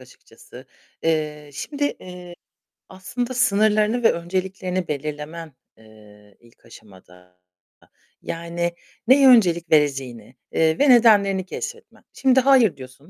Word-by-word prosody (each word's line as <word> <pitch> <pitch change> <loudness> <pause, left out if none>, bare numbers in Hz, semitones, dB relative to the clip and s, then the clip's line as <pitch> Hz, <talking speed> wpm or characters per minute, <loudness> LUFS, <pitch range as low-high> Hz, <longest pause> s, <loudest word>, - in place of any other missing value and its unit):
açıkçası. 125 -1 -17 0.4
Eee, 150 -2 -2
şimdi, 285 - -4 0.2
eee, 180 -1 -11 0.6
aslında 240 +7 -5
sınırlarını 215 0 +1
ve - - +5
önceliklerini 185 +1 -4
belirlemen, 150 +2 -6 0.2
eee, 105 -2 -20
ilk 120 -1 -25
aşamada 90 -5 -19 0.8
yani, 170 +1 -4 0.4
neye 270 +1 +6
öncelik 175 -8 +3
vereceğini, 135 -6 -1 0.2
eee, 160 +4 +1
ve 285 - +3
nedenlerini 205 -6 +4
keşfetmen. 465 - -9
Şimdi 265 -1 +2
hayır 250 - +3
diyorsun 135 +5 -14
170 Hz, 105 wpm, -21 LUFS, 140-215 Hz, 0.8 s, neye